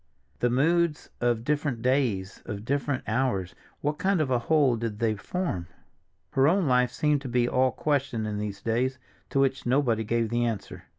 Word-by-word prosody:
The 120 - +2
moods 160 +5 +1
of 120 -2 +1
different 145 -4 -1
days, 120 -7 0
of 105 -1 -5
different 140 0 -1
hours, 110 -5 0 0.3
what 150 +1 -1
kind 190 0 +2
of 145 -4 0
a 125 - +3
whole 140 -1 +3
did 115 -2 -3
they 110 0 +1
form? 105 - -3 0.6
Her 135 +1 +4
own 185 +3 +3
life 125 -2 +3
seemed 150 -2 +1
to 135 - -6
be 120 0 +2
all 130 +1 +2
question 135 -5 -1
in 105 -1 -3
these 100 -2 -5
days, 125 +3 0 0.3
to 135 - 0
which 135 -2 +1
nobody 120 -4 +2
gave 115 +1 0
the 120 +1 +1
answer. 115 -4 -4
125 Hz, 180 wpm, -27 LUFS, 115-145 Hz, 0.6 s, Her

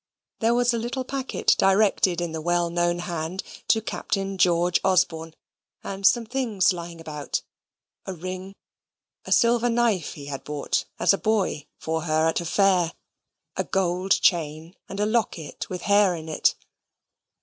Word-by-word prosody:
There 230 +1 +2
was 245 0 +3
a 235 - 0
little 245 +3 -3
packet 270 0 0
directed 195 -3 +3
in 170 -2 -2
the 160 0 -4
well 175 +1 +1
known 175 0 +1
hand 175 +1 -4 0.2
to 220 -1 +3
Captain 195 -3 -3
George 175 0 +3
Osborne, 165 -4 +1 0.5
and 195 0 +1
some 235 -2 +3
things 220 -7 +1
lying 170 -1 -7
about 150 -3 -4 0.6
a 190 - -3
ring, 185 +3 -7 0.7
a - - -8
silver 240 0 +4
knife 230 -8 +1
he 145 - -10
had 140 -1 -6
bought, 150 -1 -2
as - - +4
a 195 - -1
boy, 210 -9 0
for 160 0 -3
her 155 0 +2
at 160 - -1
a - - -6
fair; 180 -1 +2 0.6
a - - 0
gold 185 0 +1
chain, 160 +1 +1
and 195 - -6
a 210 - +2
locket 215 -8 -2
with 180 -1 -5
hair 200 -3 +4
in 160 -1 -8
it. 155 - +2
185 Hz, 160 wpm, -25 LUFS, 165-210 Hz, 0.7 s, silver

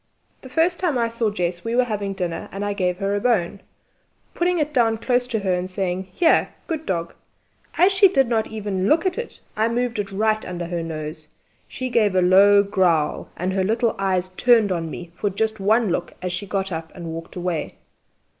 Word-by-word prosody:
The 260 - -11
first 330 +6 +1
time 335 -8 0
I 230 -1 +1
saw 230 -1 0
Jess 175 -3 -3
we 230 +1 -2
were 255 - +4
having 205 -4 -3
dinner, 180 -3 -4
and 200 +1 -4
I 205 - -1
gave 180 -2 -1
her 195 +1 -1
a 205 - +1
bone 200 -4 0 0.7
putting 355 +1 +1
it 300 -1 -1
down 225 -4 +3
close 245 +2 0
to 230 - -1
her 195 -3 0
and 180 +1 -2
saying, 185 0 -2
"Here! 330 - +3 0.2
good 320 -2 -4
dog!" 170 -2 -2 0.6
As 370 +3 +5
she 390 0 +6
did 270 -9 +2
not 225 -2 0
even 205 -3 -2
look 325 - +3
at 375 +4 0
it, 475 - -7
I 220 +1 +2
moved 235 -1 -1
it 200 -1 -3
right 215 +2 +1
under 175 -1 -5
her 170 0 -3
nose. 155 -1 -6 0.4
She 255 - -5
gave 215 -5 +2
a 185 - +4
low 200 +2 +6
growl, 180 -7 +1
and 185 +2 -2
her 190 -1 +1
little 225 +3 +1
eyes 185 -2 0
turned 220 +1 +3
on 165 -2 -2
me 170 +1 -8
for 205 - -1
just 220 +2 -2
one 215 +1 +2
look - - -3
as 180 -1 -3
she 200 +3 -4
got 195 0 -2
up 160 -1 -5
and 170 -3 -6
walked 165 0 -8
away. 180 -2 -3
200 Hz, 210 wpm, -22 LUFS, 180-235 Hz, 0.7 s, she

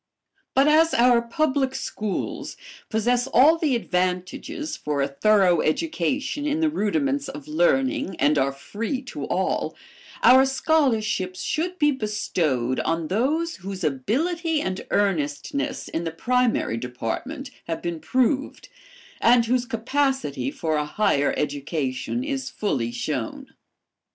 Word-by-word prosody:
But 270 +2 +5
as 320 +2 +4
our 240 0 +5
public 265 +2 0
schools 210 -3 -4 0.3
possess 245 +3 +1
all 310 +5 +5
the 295 -6 +2
advantages 190 - -2
for 150 - -3
a - - +1
thorough 180 +4 +3
education 290 - -1
in 300 +1 0
the 320 -1 +2
rudiments 280 +3 0
of 145 -1 -9
learning 260 - +1
and 145 -1 +3
are 135 +1 +2
free 225 - -4
to 245 - -6
all, - - -1 0.5
our 260 +2 +8
scholarships 235 - +1
should 345 +4 -2
be 295 -2 +4
bestowed 170 - -1
on 165 -1 -1
those 300 - 0
whose 190 0 -7
ability 310 - 0
and 190 -7 -4
earnestness 145 -8 -1
in 165 - -3
the 165 - -2
primary 240 - +1
department 125 - -5 0.2
have 165 -1 -3
been 170 -2 -3
proved, 260 - 0 0.5
and 235 0 +5
whose 245 +1 +1
capacity 255 - -1
for 155 +2 -2
a 150 - 0
higher 150 -4 +1
education 145 - -2
is 270 -2 -3
fully 125 - -2
shown. - - -4
225 Hz, 125 wpm, -24 LUFS, 165-275 Hz, 0.5 s, our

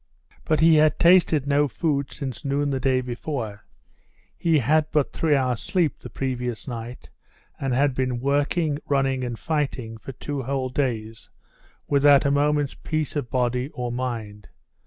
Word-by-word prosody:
But 155 -1 +1
he 160 -1 +6
had 155 0 +4
tasted 170 -5 +4
no 145 +1 +2
food 140 -2 -1
since 135 -1 -6
noon 140 0 0
the 135 - -1
day 130 0 +2
before: 120 -4 -5 0.7
he 165 -2 +2
had 150 +4 +2
but 150 -3 +1
three 155 -3 +2
hours' 125 -4 0
sleep 170 -1 0
the - - -9
previous 125 -3 -4
night, 120 0 -7 0.5
and 135 -1 -2
had 140 +1 +2
been 130 -1 -1
working, 145 +3 0
running, 135 -2 +1
and 120 -2 -4
fighting 135 -8 -3
for 135 +6 -8
two 145 +2 -4
whole 130 0 -2
days 115 -4 -3 0.6
without 140 0 +5
a 140 - +3
moment's 145 0 +1
peace 155 -2 -3
of 140 -5 -2
body 125 0 0
or 125 -1 -3
mind. 115 -5 -5
135 Hz, 155 wpm, -24 LUFS, 125-145 Hz, 0.7 s, he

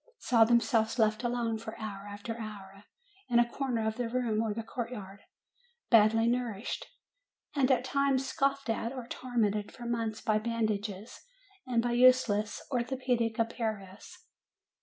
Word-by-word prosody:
saw 230 -2 +4
themselves 225 0 +2
left 215 -1 +2
alone 235 -2 -1
for 220 0 -8
hour 205 -3 -6
after 205 +3 -6
hour 200 -2 -9 0.4
in 240 - +3
a 240 0 +5
corner 240 -3 -2
of 220 +1 -2
the 245 -2 -2
room 235 -3 0
or 225 -1 -1
the 225 +2 -4
court 230 +1 -4
yard, 200 -5 -8 0.7
badly 225 0 +6
nourished, 235 -3 -2 0.7
and 275 -2 +3
at 255 -1 +3
times 275 0 +1
scoffed 275 -1 0
at, 225 +1 -1
or 255 -3 -6
tor 250 0 -7
mented 210 -2 +1
for 240 - -10
months 230 -2 -2
by 215 -1 +1
bandages 215 -2 -2 0.5
and 235 -2 +1
by 240 - 0
useless 240 -4 +3
orthopedic 245 -2 0
apparatus 220 - -4
230 Hz, 150 wpm, -30 LUFS, 215-245 Hz, 0.7 s, badly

